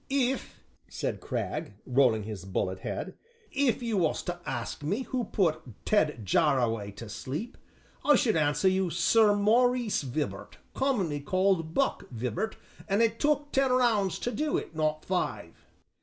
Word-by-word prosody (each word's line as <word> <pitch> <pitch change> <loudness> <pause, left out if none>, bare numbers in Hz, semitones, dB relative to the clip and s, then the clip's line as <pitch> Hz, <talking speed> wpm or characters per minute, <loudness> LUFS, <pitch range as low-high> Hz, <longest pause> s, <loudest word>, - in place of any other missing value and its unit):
'" - - -38
"If," 270 -1 -1 0.3
said - - -3
Cragg, - - -3
rolling 125 -4 +3
his 105 -3 -6
bullet 95 0 -2
head, - - -4 0.4
"if 270 -3 +1
you 230 -3 0
was 165 -4 +1
to 175 0 -4
ask 120 0 -4
me 200 - -1
who 250 -2 -2
put 165 -6 +1 0.2
Ted 150 - +1
Jarraway 115 0 +2
to 115 +2 -8
sleep, 145 - -5 0.5
I 295 - +6
should 220 - +2
answer 150 +4 +2
you, 190 -1 +2
Sir 205 +5 +4
Maurice 235 +2 +3
Vibart, 145 +2 -4 0.2
commonly 200 - 0
called 185 0 +1
'Buck' 275 - 0
Vibart; 125 - -3 0.3
an' 200 +2 +2
it 230 -1 +2
took 290 -1 +1
ten 270 -1 +2
rounds 225 -7 +2
to 245 - -2
do 300 +3 0
it, - - -6
not 155 0 -1
five." 185 -1 -3
190 Hz, 155 wpm, -29 LUFS, -, 0.5 s, I